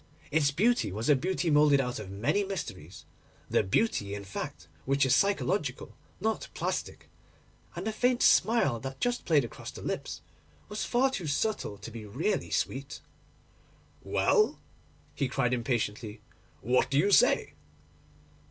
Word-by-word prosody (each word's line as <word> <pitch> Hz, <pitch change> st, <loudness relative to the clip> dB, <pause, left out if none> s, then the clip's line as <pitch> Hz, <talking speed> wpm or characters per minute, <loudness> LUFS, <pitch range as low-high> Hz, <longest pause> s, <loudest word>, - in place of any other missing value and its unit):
Its 145 Hz, -1 st, +3 dB
beauty 215 Hz, -, +2 dB
was 110 Hz, +7 st, -3 dB
a 145 Hz, -, +7 dB
beauty 175 Hz, +4 st, -1 dB
moulded 145 Hz, -1 st, +5 dB
out 125 Hz, -3 st, -2 dB
of 105 Hz, -3 st, -7 dB
many 105 Hz, -, 0 dB
mysteries—the 105 Hz, -, -5 dB
beauty, 100 Hz, -, 0 dB
in 100 Hz, -, -6 dB
fact, 95 Hz, -3 st, -6 dB, 0.2 s
which 140 Hz, +1 st, +2 dB
is 130 Hz, -, +3 dB
psychological, 200 Hz, +7 st, 0 dB, 0.2 s
not 220 Hz, 0 st, -1 dB
plastic—and -, -, -7 dB
the 220 Hz, -, 0 dB
faint 245 Hz, +3 st, +1 dB
smile 185 Hz, -, +4 dB
that 135 Hz, +2 st, -7 dB
just 245 Hz, +7 st, -1 dB
played 150 Hz, -6 st, +3 dB
across 115 Hz, -, -8 dB
the -, -, -9 dB
lips -, -, -4 dB, 0.5 s
was 210 Hz, +1 st, -3 dB
far 260 Hz, +2 st, +2 dB
too 180 Hz, -10 st, -4 dB
subtle 145 Hz, -, -1 dB
to 105 Hz, +3 st, -9 dB
be 115 Hz, -1 st, -8 dB
really 145 Hz, -, -2 dB
sweet. 135 Hz, +2 st, -2 dB, 1.0 s
'Well,' 430 Hz, -1 st, +2 dB, 0.5 s
he 140 Hz, -, -1 dB
cried 125 Hz, -1 st, 0 dB
impatiently, 115 Hz, -3 st, -2 dB, 0.4 s
'what 125 Hz, +4 st, +2 dB
do 135 Hz, -, +1 dB
you 200 Hz, +7 st, +3 dB
say? -, -, +4 dB
140 Hz, 140 wpm, -29 LUFS, -, 1.0 s, a